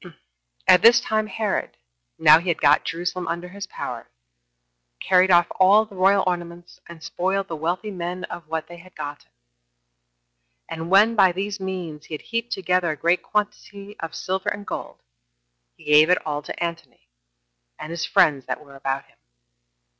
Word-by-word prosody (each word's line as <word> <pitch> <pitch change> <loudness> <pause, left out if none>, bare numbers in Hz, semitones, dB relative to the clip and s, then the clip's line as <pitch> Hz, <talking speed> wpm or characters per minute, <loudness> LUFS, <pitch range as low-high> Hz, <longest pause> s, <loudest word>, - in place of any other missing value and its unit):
2. - - -12 0.5
At 185 -1 +7
this 235 +1 +7
time 215 -2 -1
Herod, 210 0 -3 0.4
now 155 0 +7
he 175 - -9
had 170 - 0
got 145 +1 +4
Jerusalem 175 +1 -4
under 170 +2 -4
his 200 +2 -8
power, - - -7 0.9
carried 185 0 +3
off 175 -1 +6
all 200 +4 +6
the 215 - -17
royal 195 +1 +3
ornaments, 175 -1 -5
and 170 -1 -12
spoiled 190 +3 -2
the 165 - -5
wealthy 175 +7 -3
men 180 0 -5
of 170 -3 -8
what 160 0 -3
they 175 - -11
had 185 +2 -17
gotten; 145 0 -8 1.4
and 165 +1 -6
when, 210 +4 +5
by 190 -4 +5
these 200 +3 -4
means, 180 -5 -6
he 155 - -6
had - - -10
heaped 230 0 -4
together 180 -2 0
a 155 - -2
great 170 +3 +1
quantity 205 0 -4
of 165 - -6
silver 190 +1 -2
and 205 0 -6
gold, - - -7 0.7
he - - -18
gave 150 +2 +5
it 180 - +5
all 150 -1 -3
to 150 - -6
Antony, 170 - -7 0.7
and 155 - -8
his 170 -1 -4
friends 140 -4 +2
that 125 - -3
were 140 -1 -15
about 135 0 -3
him. - - -30
180 Hz, 175 wpm, -23 LUFS, 160-195 Hz, 1.4 s, At